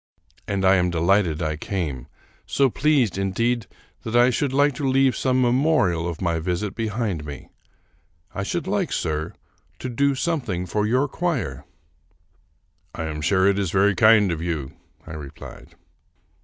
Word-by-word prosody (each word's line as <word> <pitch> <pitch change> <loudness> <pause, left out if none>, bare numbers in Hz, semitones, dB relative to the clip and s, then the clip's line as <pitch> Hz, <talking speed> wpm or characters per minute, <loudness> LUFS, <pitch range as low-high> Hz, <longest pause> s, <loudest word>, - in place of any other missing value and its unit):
And 100 -2 -1
I 95 +1 +5
am 90 0 +1
delighted 85 -1 +1
I 80 -1 -2
came; 75 -9 -4 0.4
so 135 -3 +2
pleased, 135 - +1
indeed, 115 +3 0 0.3
that 115 +1 -5
I 120 +1 +5
should 135 +2 -1
like 145 +1 +3
to 140 -2 -1
leave 135 0 +3
some 130 0 +1
memorial 120 - +2
of 85 +1 -5
my 85 -2 0
visit 90 +4 -2
behind 110 -7 -2
me. 75 -2 -9 0.8
I - - -3
should 165 - -3
like, 190 -2 -1
sir, 80 -1 -2 0.4
to 130 - -5
do 140 +3 +1
something 125 - -2
for 105 +4 -1
your 130 +5 +2
choir." 135 - -3 0.7
" - - -27
I - - -4
am 75 -1 -4
sure 95 +3 +2
it 100 0 +3
is 100 -3 -1
very 100 +3 +3
kind 110 -1 +5
of 80 -1 -3
you," 80 -6 -3 0.3
I - - -9
replied. 75 -3 -10
100 Hz, 160 wpm, -23 LUFS, 85-130 Hz, 0.8 s, I